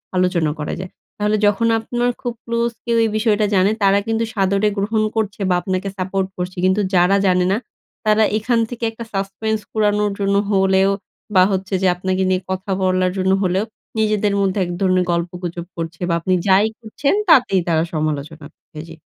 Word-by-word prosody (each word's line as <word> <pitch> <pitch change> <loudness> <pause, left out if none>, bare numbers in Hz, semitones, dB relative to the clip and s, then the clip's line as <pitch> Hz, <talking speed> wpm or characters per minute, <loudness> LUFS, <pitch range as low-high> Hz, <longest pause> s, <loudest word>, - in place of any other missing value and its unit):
আলোচনা 180 -4 +1
করা 150 - -3
যায়। 185 0 -7 0.3
তাহলে 210 +1 +1
যখন 210 +3 +2
আপনার 240 +2 -1
খুব 245 -2 -3
ক্লোজ 235 0 0
কেউ 235 -1 +1
এই 225 - +1
বিষয়টা 215 -1 +2
জানে 190 +2 +4
তারা 195 +1 +4
কিন্তু 225 0 0
সাদরে 195 +1 +1
গ্রহণ 215 +2 0
করছে 215 -2 -2
বা, 180 - +3
আপনাকে 185 +1 -2
সাপোর্ট 190 +1 -1
করছে। 180 +1 -4
কিন্তু 190 +3 +2
যারা 180 +2 +4
জানে 180 -1 +3
না, 200 - +2 0.5
তারা 215 0 +4
এখান 230 +2 +1
থেকে 240 -1 -7
একটা 225 +1 -8
suspense 200 +3 -2
কুড়ানোর 210 -1 +1
জন্য 200 0 +1 0.2
হলেও 190 0 +3 0.4
বা, 185 - +7
হচ্ছে 190 0 -3
যে 190 - +3
আপনাকে 185 +1 -1
নিয়ে 185 0 +1
কথা 190 +1 -3
বলার 185 -1 +2
জন্য 190 0 +1
হলেও 185 +3 +1 0.3
নিজেদের 210 -1 +1
মধ্যে 195 0 0
এক 175 - -5
ধরনের 185 -1 +2
গল্প 170 0 -1
গুজব 170 0 -4
করছে 165 +1 -5
বা, - - +1
আপনি 185 +3 0
যাই 195 +3 +5
করছেন, 240 +5 -1 0.2
তাতেই 245 - +5
তারা 160 -1 +2
সমালোচনা 155 0 -3 0.3
এ - - -4
জি। 165 - -10
195 Hz, 180 wpm, -19 LUFS, 185-215 Hz, 0.5 s, বা